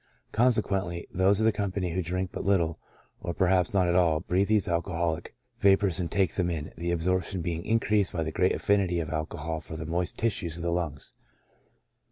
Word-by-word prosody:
Con 125 Hz, +3 st, +4 dB
sequently, 95 Hz, -6 st, -1 dB
those 95 Hz, +2 st, +3 dB
of 110 Hz, -, +2 dB
the 110 Hz, -, +5 dB
company 100 Hz, -3 st, -2 dB
who 95 Hz, +3 st, -1 dB
drink 90 Hz, +2 st, -2 dB
but -, -, -4 dB
little, 85 Hz, -5 st, +1 dB, 0.4 s
or 85 Hz, -, -4 dB
perhaps 90 Hz, -1 st, +2 dB
not 95 Hz, -3 st, +2 dB
at 85 Hz, -, +2 dB
all, 85 Hz, -3 st, +3 dB
breathe 95 Hz, +2 st, +1 dB
these 105 Hz, -2 st, +2 dB
alcoholic 85 Hz, -1 st, -2 dB, 0.2 s
vapors 95 Hz, -2 st, +3 dB
and 85 Hz, -2 st, -2 dB
take 95 Hz, -5 st, +1 dB
them 90 Hz, -2 st, 0 dB
in, 80 Hz, -3 st, -4 dB
the 85 Hz, +1 st, -3 dB
absorption 90 Hz, +1 st, 0 dB
being 85 Hz, -1 st, -3 dB
increased 105 Hz, -3 st, +1 dB
by 85 Hz, -4 st, -1 dB
the 80 Hz, -, -3 dB
great 90 Hz, +4 st, +2 dB
affinity 95 Hz, -4 st, +1 dB
of 80 Hz, -2 st, -4 dB
alcohol 80 Hz, 0 st, -3 dB
for 80 Hz, 0 st, -7 dB
the 80 Hz, -, -5 dB
moist 85 Hz, +2 st, -2 dB
tissue 110 Hz, -6 st, 0 dB
of 85 Hz, +1 st, -4 dB
the 85 Hz, -, 0 dB
lungs. 85 Hz, -5 st, -3 dB
90 Hz, 200 wpm, -28 LUFS, 85-95 Hz, 0.4 s, the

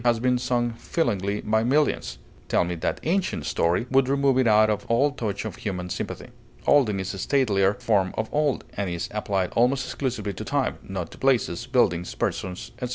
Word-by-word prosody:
has 120 Hz, -2 st, +3 dB
been 125 Hz, +1 st, +2 dB
sung 120 Hz, -1 st, 0 dB
feelingly 105 Hz, -, -1 dB
by 110 Hz, +1 st, +1 dB
millions; 120 Hz, -, +1 dB, 0.3 s
"tell -, -, +2 dB
me 90 Hz, 0 st, -3 dB
that 85 Hz, -, -2 dB
ancient 175 Hz, -, 0 dB
story" 85 Hz, +8 st, +1 dB
would 135 Hz, -1 st, +3 dB
remove 140 Hz, -1 st, +3 dB
it 130 Hz, -, +3 dB
out 110 Hz, 0 st, +6 dB
of 105 Hz, -1 st, -1 dB
all 135 Hz, +5 st, +3 dB
touch 110 Hz, -7 st, -4 dB
of 105 Hz, -5 st, -5 dB
human 90 Hz, -3 st, -4 dB
sympathy. -, -, -5 dB, 0.4 s
Olden 115 Hz, -9 st, +4 dB
is 95 Hz, +1 st, -3 dB
a 95 Hz, -, -7 dB
statelier 105 Hz, -6 st, +2 dB
form 105 Hz, -6 st, +2 dB
of 110 Hz, -, -1 dB
old, 150 Hz, -2 st, +1 dB
and 100 Hz, -2 st, -2 dB
is 85 Hz, 0 st, -3 dB
applied 100 Hz, -3 st, -1 dB
almost 125 Hz, +3 st, +2 dB
exclusively 115 Hz, -7 st, -3 dB
to -, -, -6 dB
time, -, -, -1 dB
not 95 Hz, -3 st, -5 dB
to -, -, -13 dB
places, 120 Hz, -5 st, +1 dB
buildings, 90 Hz, -10 st, +1 dB
persons, 90 Hz, -1 st, -3 dB
etc. 125 Hz, -, -2 dB
110 Hz, 190 wpm, -25 LUFS, 95-130 Hz, 0.4 s, out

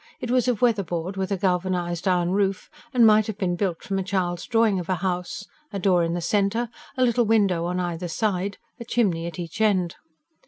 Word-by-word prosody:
It 245 Hz, -4 st, -4 dB
was 255 Hz, -1 st, +2 dB
of 245 Hz, -2 st, 0 dB
weather 230 Hz, -4 st, +4 dB
board, 175 Hz, +1 st, -4 dB
with 190 Hz, 0 st, -3 dB
a 195 Hz, -, +1 dB
galvanised 180 Hz, -1 st, -1 dB
iron 180 Hz, -1 st, +2 dB
roof, 195 Hz, 0 st, 0 dB, 0.2 s
and 245 Hz, -4 st, +5 dB
might 215 Hz, -1 st, +5 dB
have 215 Hz, -3 st, -4 dB
been 180 Hz, -3 st, 0 dB
built 175 Hz, -3 st, -2 dB
from 195 Hz, -1 st, -2 dB
a -, -, -1 dB
child's 180 Hz, -3 st, -2 dB
drawing 225 Hz, -5 st, +3 dB
of 175 Hz, -, -7 dB
a 185 Hz, -, +2 dB
house: 180 Hz, +2 st, -3 dB, 0.3 s
a 200 Hz, -, -3 dB
door 180 Hz, -2 st, +3 dB
in 165 Hz, +1 st, -1 dB
the 175 Hz, -, -2 dB
centre, 205 Hz, +6 st, +1 dB, 0.3 s
a 255 Hz, -, +3 dB
little 240 Hz, 0 st, +2 dB
window 200 Hz, -6 st, +2 dB
on 180 Hz, +1 st, -1 dB
either 175 Hz, 0 st, -3 dB
side, 200 Hz, +2 st, -1 dB, 0.2 s
a -, -, -5 dB
chimney 195 Hz, -8 st, 0 dB
at 170 Hz, -, -7 dB
each 175 Hz, +3 st, -5 dB
end. 185 Hz, -5 st, +2 dB
190 Hz, 220 wpm, -24 LUFS, 175-215 Hz, 0.3 s, and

